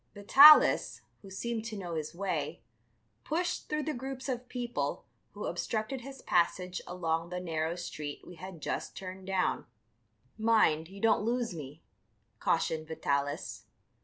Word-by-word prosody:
Vitalis, 280 Hz, +9 st, +7 dB, 0.2 s
who 195 Hz, -, -12 dB
seemed 225 Hz, +4 st, -3 dB
to 220 Hz, -2 st, -5 dB
know 175 Hz, -3 st, -5 dB
his 155 Hz, 0 st, -4 dB
way, 170 Hz, -4 st, -3 dB, 0.6 s
pushed 350 Hz, +3 st, -2 dB
through 300 Hz, 0 st, -1 dB
the 310 Hz, -, -2 dB
groups 265 Hz, +1 st, -6 dB
of 250 Hz, -1 st, -4 dB
people 245 Hz, -1 st, -3 dB, 0.3 s
who -, -, -6 dB
obstructed 230 Hz, +4 st, -2 dB
his 270 Hz, +2 st, -10 dB
passage 180 Hz, +1 st, +1 dB
along 165 Hz, -2 st, -2 dB
the 180 Hz, 0 st, -3 dB
narrow 165 Hz, -1 st, -2 dB
street 150 Hz, -4 st, -6 dB
we -, -, -10 dB
had 185 Hz, -3 st, -9 dB
just -, -, -3 dB
turned 190 Hz, 0 st, -8 dB
down. 190 Hz, -1 st, 0 dB, 0.7 s
"Mind, 215 Hz, -8 st, +3 dB
you 195 Hz, +3 st, -11 dB
don't 220 Hz, 0 st, +3 dB
lose 235 Hz, -1 st, -1 dB
me," 150 Hz, -1 st, -9 dB, 0.6 s
cautioned 155 Hz, -1 st, 0 dB
Vitalis. 145 Hz, -3 st, -2 dB
190 Hz, 140 wpm, -31 LUFS, 165-235 Hz, 0.7 s, Vitalis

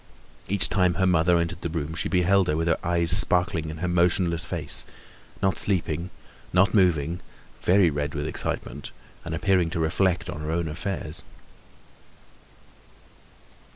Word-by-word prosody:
Each 100 Hz, 0 st, +3 dB
time 90 Hz, -3 st, +2 dB
her 95 Hz, -, +1 dB
mother 85 Hz, -1 st, +3 dB
entered 85 Hz, +1 st, -2 dB
the 85 Hz, -, -3 dB
room 80 Hz, -1 st, -4 dB
she 85 Hz, -, -2 dB
beheld 95 Hz, +1 st, +3 dB
her 75 Hz, -, 0 dB
with 80 Hz, +1 st, -1 dB
her 80 Hz, -, +1 dB
eyes 85 Hz, 0 st, +2 dB
sparkling 90 Hz, -4 st, +2 dB
in 80 Hz, -, -7 dB
her 90 Hz, +3 st, -3 dB
motionless 85 Hz, -1 st, +2 dB
face—not 95 Hz, -4 st, -3 dB
sleeping, 85 Hz, -3 st, -1 dB, 0.4 s
not 95 Hz, +2 st, +3 dB
moving, 85 Hz, -5 st, +2 dB, 0.4 s
very 90 Hz, -2 st, +4 dB
red 75 Hz, +1 st, -3 dB
with 75 Hz, 0 st, -3 dB
excitement, 75 Hz, -2 st, -4 dB, 0.3 s
and 80 Hz, 0 st, -4 dB
appearing 90 Hz, -1 st, +2 dB
to 85 Hz, 0 st, -3 dB
reflect 90 Hz, +2 st, +1 dB
on 75 Hz, -, -6 dB
her 75 Hz, -, -4 dB
own 85 Hz, +1 st, -1 dB
affairs. 85 Hz, 0 st, -4 dB
85 Hz, 145 wpm, -25 LUFS, 80-90 Hz, 0.4 s, very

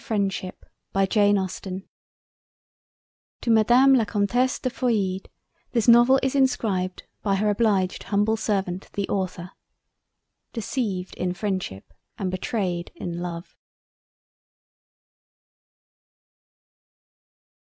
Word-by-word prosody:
LOVE 220 Hz, -2 st, +1 dB
AND 195 Hz, -1 st, +1 dB
FREINDSHIP 195 Hz, 0 st, -1 dB, 1.5 s
TO 235 Hz, -, 0 dB
MADAME 240 Hz, +5 st, +6 dB
LA 250 Hz, -4 st, +5 dB
COMTESSE 235 Hz, +5 st, +1 dB
DE 255 Hz, -, -3 dB
FEUILLIDE 205 Hz, -7 st, -1 dB, 0.4 s
THIS 230 Hz, -2 st, +1 dB
NOVEL 240 Hz, +3 st, +7 dB
IS 265 Hz, -, +1 dB
INSCRIBED 210 Hz, -9 st, 0 dB, 0.2 s
BY 200 Hz, -2 st, +1 dB
HER 210 Hz, +2 st, +1 dB
OBLIGED 200 Hz, -4 st, +1 dB
HUMBLE 210 Hz, +2 st, +1 dB
SERVANT 190 Hz, -4 st, -2 dB
THE 200 Hz, -1 st, -2 dB
AUTHOR. 185 Hz, -2 st, -3 dB, 1.0 s
"Deceived 210 Hz, -6 st, -3 dB
in 180 Hz, 0 st, -2 dB
Freindship 185 Hz, -, -3 dB, 0.3 s
and 190 Hz, -3 st, -2 dB
Betrayed 185 Hz, -2 st, -2 dB
in 170 Hz, -1 st, -5 dB
Love." 175 Hz, 0 st, -6 dB
200 Hz, 90 wpm, -24 LUFS, 185-230 Hz, 1.5 s, NOVEL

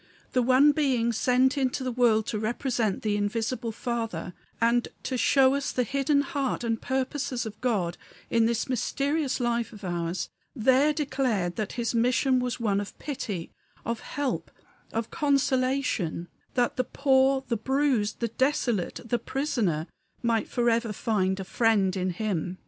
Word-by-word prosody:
The 255 Hz, -, +2 dB
one 260 Hz, +4 st, +6 dB
Being 260 Hz, -6 st, +1 dB
sent 255 Hz, +4 st, +2 dB
into 260 Hz, 0 st, 0 dB
the 255 Hz, -, -1 dB
world 230 Hz, -3 st, +3 dB
to 215 Hz, -, -2 dB
represent 225 Hz, -1 st, -1 dB
the 210 Hz, -1 st, +1 dB
Invisible 225 Hz, +3 st, -1 dB
Father, 225 Hz, -7 st, -3 dB, 0.3 s
and 235 Hz, +1 st, +2 dB, 0.2 s
to 260 Hz, -, -2 dB
show 265 Hz, +1 st, +4 dB
us 280 Hz, 0 st, -1 dB
the 250 Hz, -, +1 dB
hidden 275 Hz, +4 st, +2 dB
heart 285 Hz, -5 st, -2 dB
and 230 Hz, -1 st, -1 dB
purposes 265 Hz, -1 st, -2 dB
of 220 Hz, -1 st, -8 dB
God 200 Hz, -9 st, 0 dB, 0.3 s
in 230 Hz, -1 st, +3 dB
this 230 Hz, -1 st, 0 dB
mysterious 275 Hz, +4 st, 0 dB
life 235 Hz, -1 st, 0 dB
of 210 Hz, -2 st, -12 dB
ours, 175 Hz, 0 st, -2 dB, 0.3 s
there 260 Hz, +5 st, +4 dB
declared 255 Hz, -, -1 dB
that 215 Hz, -2 st, -3 dB
his 235 Hz, -1 st, -1 dB
mission 250 Hz, +2 st, +3 dB
was 250 Hz, -1 st, -2 dB
one 205 Hz, -3 st, +1 dB
of 205 Hz, -, -8 dB
pity, 205 Hz, -, -5 dB, 0.3 s
of 230 Hz, -1 st, -2 dB
help, 285 Hz, -3 st, -3 dB, 0.4 s
of 225 Hz, 0 st, -3 dB
consolation; 260 Hz, -, +1 dB, 0.3 s
that 245 Hz, +1 st, +1 dB
the 255 Hz, -, +2 dB
poor, 265 Hz, 0 st, +2 dB
the 235 Hz, -, 0 dB
bruised, 255 Hz, -3 st, 0 dB
the 235 Hz, -, +1 dB
desolate, 240 Hz, -5 st, 0 dB
the 235 Hz, +1 st, 0 dB
prisoner, 225 Hz, -, -1 dB, 0.4 s
might 230 Hz, -2 st, +1 dB
forever 235 Hz, -2 st, +1 dB
find 195 Hz, -3 st, 0 dB
a -, -, -3 dB
Friend 200 Hz, -2 st, +2 dB
in 185 Hz, -1 st, -1 dB
him. 185 Hz, -2 st, -2 dB
240 Hz, 155 wpm, -27 LUFS, 215-265 Hz, 0.4 s, one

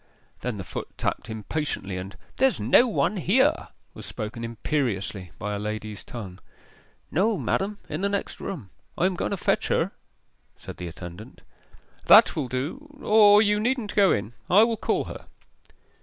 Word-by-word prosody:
Then 125 Hz, -4 st, -3 dB
the 95 Hz, -, -5 dB
foot -, -, -6 dB
tapped -, -, -2 dB
impatiently, 110 Hz, -2 st, -3 dB
and 95 Hz, +2 st, -7 dB, 0.2 s
'There's 265 Hz, 0 st, +3 dB
no 250 Hz, -, +5 dB
one 215 Hz, -2 st, 0 dB
here!' 195 Hz, +9 st, +2 dB, 0.3 s
was -, -, -9 dB
spoken 115 Hz, +1 st, -5 dB
imperiously 115 Hz, -, -2 dB
by 105 Hz, 0 st, -3 dB
a 100 Hz, -, -3 dB
lady's 105 Hz, 0 st, -5 dB
tongue. 100 Hz, -6 st, -8 dB, 0.7 s
'No, 205 Hz, +5 st, +2 dB
madam; 200 Hz, +2 st, -1 dB
in -, -, -4 dB
the 200 Hz, -, +1 dB
next 200 Hz, 0 st, -3 dB
room. 125 Hz, -, -6 dB, 0.3 s
I 175 Hz, -, +2 dB
am 190 Hz, -, +2 dB
going -, -, -2 dB
to 200 Hz, -, -2 dB
fetch -, -, +1 dB
her,' -, -, +1 dB, 0.7 s
said -, -, -10 dB
the 90 Hz, -, -5 dB
attendant. 85 Hz, +4 st, -10 dB, 0.6 s
'That -, -, +8 dB
will 145 Hz, -4 st, -1 dB
do 180 Hz, -, -5 dB
or 210 Hz, -1 st, +7 dB
you 210 Hz, 0 st, +2 dB
needn't 235 Hz, -1 st, -1 dB
go 200 Hz, -3 st, +5 dB
in; 105 Hz, +3 st, -1 dB, 0.2 s
I 205 Hz, +4 st, +7 dB
will 230 Hz, 0 st, +2 dB
call 220 Hz, -, 0 dB
her. -, -, -9 dB
145 Hz, 165 wpm, -25 LUFS, -, 0.7 s, That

